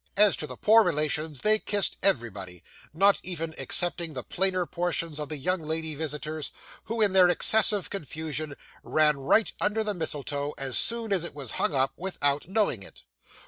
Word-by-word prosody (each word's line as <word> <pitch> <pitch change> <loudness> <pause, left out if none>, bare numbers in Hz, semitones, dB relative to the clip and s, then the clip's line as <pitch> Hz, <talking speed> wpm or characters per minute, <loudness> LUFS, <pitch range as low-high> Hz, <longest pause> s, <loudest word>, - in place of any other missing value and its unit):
As 210 -1 +6
to 150 - -3
the - - -9
poor 225 +1 +5
relations, 155 -3 -1
they 215 0 +3
kissed 205 -1 +2
everybody, 105 - -1 0.3
not 195 +5 +3
even 165 -3 -4
excepting 170 -3 0
the 130 - -3
plainer 185 -1 0
portions 170 -3 -3
of 150 -1 -5
the 155 - -4
young 180 +6 -1
lady 160 0 -3
visitors, 155 0 -5 0.3
who, 225 0 -3
in 210 -2 +5
their 185 -2 +6
excessive 210 +2 +4
confusion, 155 -4 -4 0.3
ran 150 -2 +2
right 140 +11 +2
under 220 +1 +1
the 210 -1 0
mistletoe, 145 -4 -4
as 135 -2 -3
soon 230 -3 0
as 185 -4 0
it 170 - -5
was 135 -6 -6
hung - - 0
up, 135 0 +1
without 145 -6 -2
knowing 195 - 0
it! 95 - -12
160 Hz, 175 wpm, -26 LUFS, 145-195 Hz, 0.3 s, As